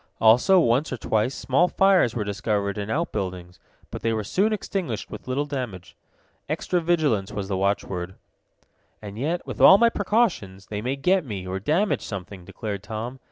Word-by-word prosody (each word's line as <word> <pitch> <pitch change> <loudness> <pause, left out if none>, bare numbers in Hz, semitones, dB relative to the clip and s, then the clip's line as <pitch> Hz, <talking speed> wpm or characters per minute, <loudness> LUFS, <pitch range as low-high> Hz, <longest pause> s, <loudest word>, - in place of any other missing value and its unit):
Also, 125 - +5
once 130 0 +2
or 130 - -3
twice, 110 +3 0
small 135 +7 +2
fires 190 - +3
were 110 - -1
discovered 100 0 -2
in 105 0 -5
outbuildings, 90 - -3 0.3
but - - -6
they 115 - 0
were 110 -1 -1
soon 195 - +1
extinguished 185 - -3
with - - -9
little 135 +3 -1
damage. 125 -11 -6 0.5
Extra 180 -1 -1
vigilance 150 - +1
was 100 -2 -4
the 95 - -1
watchword. 95 -2 -2 0.8
"And 105 0 -9
yet, 165 +6 -2
with - - -6
all 190 - +9
my 235 +2 +5
precautions, 195 - 0
they 105 -1 -5
may 130 +4 -2
get 180 +7 +2
me, 100 -8 -6
or 95 +1 -3
damage 165 - +1
something," 95 -2 -7
declared 100 -1 -5
Tom. 115 +5 -6
115 Hz, 170 wpm, -24 LUFS, 100-165 Hz, 0.8 s, all